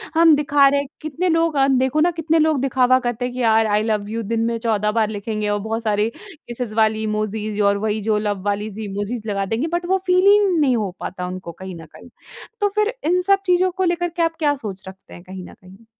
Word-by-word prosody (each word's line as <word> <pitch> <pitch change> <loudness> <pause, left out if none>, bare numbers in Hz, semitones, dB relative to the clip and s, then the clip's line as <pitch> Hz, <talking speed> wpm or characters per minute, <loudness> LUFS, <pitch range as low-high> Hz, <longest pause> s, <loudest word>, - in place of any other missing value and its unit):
हम 325 -2 +6
दिखा 285 -1 +4
रहे 280 +1 +2
हैं 280 - -4
कितने 310 +4 -2
लोग 330 -1 +1
अ, 270 - +4 0.2
देखो 270 +4 0
ना - - +1
कितने 325 +1 +2
लोग 305 -4 +1
दिखावा 255 -1 +3
करते 240 +1 -2
हैं 245 - -4
कि 255 - -4
यार 225 -1 +3
आई 210 0 +1
लव 210 -2 -1
यू 230 +1 -3
दिन 225 - 0
में 230 0 -1
14 215 -2 0
बार 215 -1 +1
लिखेंगे 210 0 -3
और 205 0 0
बहुत 225 +2 -4
सारी 210 0 +1
किसेज़ 250 - -8
वाली 220 0 +2
इमोजीज़ 215 0 -2
और 200 0 +3
वही 215 0 -1
जो 215 0 +1
लव 205 -2 -2
वाली 205 +1 -1
ज़ 205 - -10
इमोजीज़ 210 +2 -4
लगा 200 -2 -1
देंगे 225 +9 -2
बट 345 0 -1
वो 380 +2 +2
फ़ील 365 +1 +3
ही 410 +1 +7 0.2
नहीं 265 -4 +3
हो 210 -3 -1
पाता 180 -1 -5
उनको 185 -1 -7
कहीं 185 +2 -9
न 165 -1 -10
कहीं। 250 - -15 0.5
तो 410 0 +2
फिर 425 +2 +1
इन 360 +3 +2
सब 390 +1 +2
चीज़ों 365 0 +2
को 375 +1 -2
लेकर 350 0 0
के 340 +1 -4
आप 330 0 0
क्या 295 -2 +2
सोच 200 -7 -8
रखते 190 0 -13
हैं 175 - -12
कहीं 185 0 -9
न - - -12
कहीं? 190 +4 -18
225 Hz, 250 wpm, -20 LUFS, 210-310 Hz, 0.5 s, ही